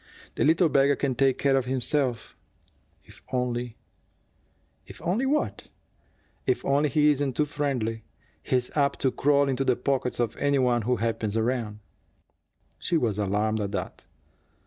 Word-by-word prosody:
"The - - 0
little 165 +3 +4
beggar 140 -1 +3
can 135 -2 -1
take 135 +1 +2
care 140 -1 +2
of 135 -2 +1
himself, 130 -1 -1 0.7
if - - -17
only 125 -2 -2 0.6
" - - -41
"If - - -12
only 220 +10 0
what?" 300 +2 -1 0.8
"If 385 - 0
only 145 +2 +2
he 150 +2 +4
isn't 140 -3 -1
too 150 - +3
friendly. 130 -7 -2 0.4
He's 125 -1 -1
apt 140 -2 +1
to 130 - +2
crawl 140 +2 +2
into 135 0 0
the 130 -2 +2
pockets 130 -1 -1
of 115 -2 0
any 140 0 +1
one 125 -2 +2
who 125 +4 +1
happens 115 -2 -2
around." 110 -2 -2 1.0
She 170 - 0
was 110 -8 0
alarmed 105 +2 0
at 100 0 -3
that. 95 - -5
130 Hz, 155 wpm, -26 LUFS, 115-140 Hz, 1.0 s, little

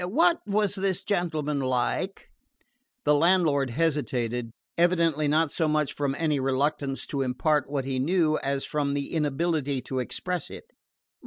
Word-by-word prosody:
What 330 - +3
was 205 -1 +1
this 195 -2 -1
gentleman 155 -7 -1
like?" 130 +9 -1 0.8
The 150 - +5
landlord 150 -4 +3
hesitated, 125 -5 -1 0.3
evidently 165 -3 +2
not 155 +1 +2
so 160 - +1
much 150 -1 +1
from 140 -1 -1
any 155 -3 +1
reluctance 135 +1 -1
to 140 - -3
impart 135 +3 +1
what 140 -2 -2
he 135 -1 -2
knew 155 +1 +2
as 135 0 -1
from 145 -2 -1
the 140 -1 -3
inability 150 -2 0
to 130 - -3
express 175 +6 -3
it. - - -11
150 Hz, 145 wpm, -27 LUFS, 135-170 Hz, 0.8 s, The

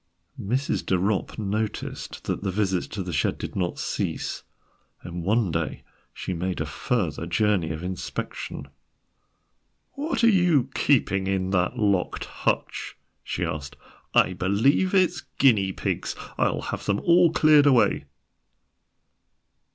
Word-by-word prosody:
Mrs. 130 +8 -1
de 95 - +1
Ropp 100 +2 -1
noticed 105 +1 -3
that - - -2
the 100 - -2
visits 95 -2 0
to 100 -3 -5
the 90 -1 -5
shed 70 - +1
did - - -6
not 90 -3 -1
cease, - - -3 0.6
and 85 0 -6
one 105 0 +2
day 85 -1 -3 0.3
she 95 - -5
made 90 +2 -2
a 75 - -1
further 85 - -2
journey 90 -1 +1
of 80 +1 -5
inspection. 90 -5 -5 1.2
"What 295 -2 -2
are - - +7
you 175 - +3
keeping 100 -9 +2
in 95 -1 0
that 90 +5 +1
locked 100 -5 0
hutch?" - - -2 0.3
she - - -2
asked. 75 -3 -5 0.4
"I 95 - +5
believe 110 - +2
it's 180 -4 +3 0.2
guinea 105 -8 +4
pigs. - - -3 0.2
I'll - - +1
have - - -5
them 100 0 +2
all 170 -1 +5
cleared 155 -3 +5
away." 130 -4 +3
100 Hz, 135 wpm, -25 LUFS, 90-130 Hz, 1.2 s, are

